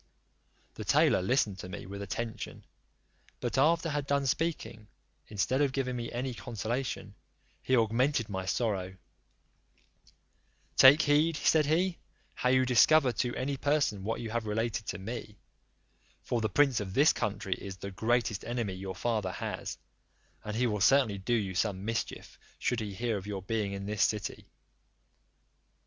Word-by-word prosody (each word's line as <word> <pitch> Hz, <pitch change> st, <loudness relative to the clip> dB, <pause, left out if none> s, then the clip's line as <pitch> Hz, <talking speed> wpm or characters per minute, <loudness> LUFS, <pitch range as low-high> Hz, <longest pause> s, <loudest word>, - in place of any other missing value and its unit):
The -, -, -7 dB
tailor -, -, +4 dB
listened 100 Hz, -2 st, +1 dB
to 90 Hz, -, -7 dB
me 90 Hz, -, -7 dB
with 100 Hz, +2 st, -7 dB
attention; 110 Hz, +4 st, -5 dB, 0.7 s
but 120 Hz, -, -2 dB
after 165 Hz, +4 st, +3 dB
had 145 Hz, -1 st, -2 dB
done 140 Hz, -1 st, +1 dB
speaking, 130 Hz, -7 st, -2 dB, 0.4 s
instead 115 Hz, +6 st, 0 dB
of 140 Hz, -2 st, +2 dB
giving 125 Hz, -2 st, -1 dB
me 120 Hz, -1 st, -4 dB
any 125 Hz, +2 st, -3 dB
consolation, 115 Hz, -2 st, -4 dB, 0.5 s
he 130 Hz, -, +2 dB
augmented 115 Hz, +2 st, +2 dB
my 95 Hz, -2 st, -4 dB
sorrow: 95 Hz, -4 st, -1 dB, 1.8 s
"Take 140 Hz, +4 st, +8 dB
heed," 150 Hz, +3 st, +3 dB
said 155 Hz, -1 st, +3 dB
he, 175 Hz, +3 st, +1 dB, 0.3 s
"how 125 Hz, -, 0 dB
you 130 Hz, 0 st, +4 dB
discover 130 Hz, +3 st, +5 dB
to 120 Hz, +1 st, -2 dB
any 135 Hz, +2 st, -2 dB
person 140 Hz, -9 st, +1 dB
what 115 Hz, +3 st, -2 dB
you 115 Hz, -2 st, -5 dB
have 115 Hz, -1 st, -2 dB
related 110 Hz, 0 st, -2 dB
to -, -, -3 dB
me; 105 Hz, +1 st, -7 dB, 0.9 s
for 120 Hz, -, -1 dB
the 110 Hz, -, 0 dB
prince 135 Hz, +1 st, +3 dB
of 95 Hz, -2 st, -5 dB
this 145 Hz, +4 st, +6 dB
country 100 Hz, -2 st, -2 dB
is 95 Hz, +1 st, -8 dB
the 100 Hz, +1 st, -7 dB
greatest 115 Hz, +1 st, 0 dB
enemy 120 Hz, -5 st, -2 dB
your 95 Hz, 0 st, -6 dB
father 110 Hz, -5 st, -1 dB
has, -, -, -5 dB, 0.7 s
and 105 Hz, 0 st, -5 dB
he 125 Hz, +2 st, +2 dB
will 105 Hz, -4 st, -1 dB
certainly 120 Hz, -4 st, +4 dB
do 120 Hz, +6 st, 0 dB
you 100 Hz, -5 st, -1 dB
some 95 Hz, +1 st, -1 dB
mischief, 115 Hz, +1 st, -4 dB, 0.2 s
should 125 Hz, -, -1 dB
he 105 Hz, -3 st, -5 dB
hear 115 Hz, 0 st, -1 dB
of 100 Hz, +1 st, -8 dB
your 100 Hz, -2 st, -4 dB
being 105 Hz, 0 st, -1 dB
in 100 Hz, 0 st, -5 dB
this 105 Hz, 0 st, -2 dB
city." 105 Hz, -5 st, -1 dB
115 Hz, 160 wpm, -30 LUFS, 100-130 Hz, 1.8 s, Take